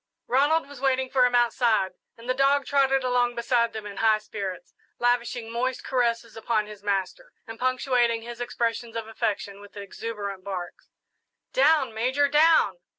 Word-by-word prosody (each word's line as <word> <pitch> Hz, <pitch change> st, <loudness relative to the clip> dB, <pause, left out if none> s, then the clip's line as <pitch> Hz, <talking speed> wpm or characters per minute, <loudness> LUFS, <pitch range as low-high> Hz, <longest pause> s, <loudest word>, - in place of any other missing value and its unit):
Ronald 290 Hz, +5 st, +2 dB
was 280 Hz, -2 st, -12 dB
waiting 265 Hz, -1 st, +1 dB
for 255 Hz, -2 st, +4 dB
him 245 Hz, -, -1 dB
outside, 235 Hz, -5 st, +2 dB, 0.3 s
and 230 Hz, +1 st, -13 dB
the 255 Hz, -, +2 dB
dog 275 Hz, +1 st, +2 dB
trotted 270 Hz, -1 st, +2 dB
along 245 Hz, -1 st, +1 dB
beside 235 Hz, -1 st, +1 dB
them 220 Hz, -1 st, -7 dB
in 205 Hz, -1 st, -8 dB
high 220 Hz, -1 st, +4 dB
spirits, 200 Hz, -4 st, -7 dB, 0.2 s
lavishing 240 Hz, -1 st, 0 dB
moist 250 Hz, +2 st, -2 dB
caresses 235 Hz, -3 st, -1 dB
upon 225 Hz, -1 st, 0 dB
his 210 Hz, -1 st, -11 dB
master, 200 Hz, -, -3 dB
and 225 Hz, -2 st, -9 dB
punctuating 250 Hz, -2 st, +1 dB
his 240 Hz, +1 st, -8 dB
expressions 235 Hz, -1 st, -2 dB
of 225 Hz, -1 st, -4 dB
affection 205 Hz, -2 st, -3 dB
with 205 Hz, 0 st, -14 dB
exuberant 200 Hz, -1 st, -6 dB
barks. 185 Hz, -3 st, -7 dB, 0.6 s
"Down, 275 Hz, -3 st, +3 dB
Major, 260 Hz, +6 st, +1 dB
down!" 320 Hz, -, +4 dB
240 Hz, 155 wpm, -26 LUFS, 220-260 Hz, 0.6 s, for